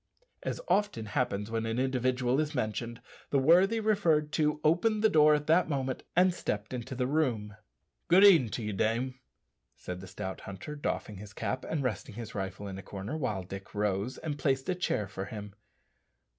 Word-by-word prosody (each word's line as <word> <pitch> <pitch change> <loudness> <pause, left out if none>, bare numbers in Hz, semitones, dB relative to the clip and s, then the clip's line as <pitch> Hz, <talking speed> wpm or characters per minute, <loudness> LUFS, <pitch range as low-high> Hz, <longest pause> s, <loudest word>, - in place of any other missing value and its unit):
As - - -3
often 205 - +1
happens 105 -1 -1
when 115 0 -1
an 115 +1 -2
individual 130 0 +1
is 150 -1 -1
mentioned, 115 0 -3 0.3
the 140 - +2
worthy 180 +11 +5
referred 175 -9 +2
to 150 -1 +1
opened 210 +7 +2
the 220 - +6
door 150 -3 +6
at 150 0 -2
that 165 +2 +3
moment 135 -3 -2
and 180 +1 +5
stepped 105 - -3
into 125 +1 -5
the 125 0 0
room. 125 -8 0 0.5
"Good 180 +3 +6
e'en 165 - +7
t'ye, 105 -1 -3
dame," 125 +6 0 0.6
said 90 0 -7
the 95 - -9
stout 95 +1 -6
hunter, 100 +9 -7
doffing 110 -7 -3
his 105 +1 -10
cap, 130 - -3
and 150 -3 -1
resting 125 -2 -3
his 115 -1 -7
rifle 95 0 -4
in 95 -1 -6
a - - -6
corner, 100 +9 -6
while 110 -11 -2
Dick 95 +3 -9
rose 105 +3 -1
and 145 -2 -4
placed 135 -2 0
a - - +3
chair 175 - -1
for 95 0 -5
him. 105 -1 -8
125 Hz, 185 wpm, -30 LUFS, 105-155 Hz, 0.6 s, e'en